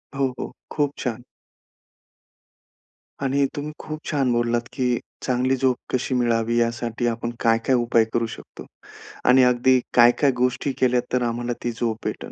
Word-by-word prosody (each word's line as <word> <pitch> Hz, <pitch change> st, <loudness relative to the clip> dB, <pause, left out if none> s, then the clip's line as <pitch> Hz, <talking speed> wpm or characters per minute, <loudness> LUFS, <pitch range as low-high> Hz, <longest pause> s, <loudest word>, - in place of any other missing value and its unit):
हो, 135 Hz, -2 st, 0 dB
हो. -, -, -5 dB, 0.2 s
खूप 145 Hz, -2 st, 0 dB
छान. 120 Hz, -1 st, -4 dB, 2.0 s
आणि 140 Hz, +1 st, +2 dB
तुम्ही 150 Hz, +1 st, -4 dB
खूप 155 Hz, 0 st, -6 dB
छान 140 Hz, -5 st, 0 dB
बोललात, 120 Hz, 0 st, +1 dB
की 125 Hz, -3 st, 0 dB, 0.3 s
चांगली 130 Hz, +1 st, +1 dB
झोप 130 Hz, -1 st, +2 dB, 0.2 s
कशी 130 Hz, +1 st, 0 dB
मिळावी 115 Hz, -1 st, +1 dB
यासाठी 115 Hz, 0 st, -1 dB
आपण 115 Hz, 0 st, -2 dB
काय-काय 115 Hz, +3 st, +2 dB
उपाय 120 Hz, -1 st, +3 dB
करू 115 Hz, 0 st, +1 dB
शकतो -, -, -11 dB, 0.6 s
आणि 130 Hz, +1 st, +7 dB
अगदी 125 Hz, +1 st, +4 dB
काय, 120 Hz, 0 st, +7 dB
काय 140 Hz, +1 st, +2 dB
गोष्टी 125 Hz, +3 st, 0 dB
केल्यात 125 Hz, -1 st, +2 dB
तर 125 Hz, -, +2 dB
आम्हाला 120 Hz, +1 st, -2 dB
ती 120 Hz, -, -1 dB
झोप 115 Hz, -1 st, -2 dB
भेटेल. -, -, -4 dB
125 Hz, 150 wpm, -23 LUFS, 120-130 Hz, 2.0 s, आणि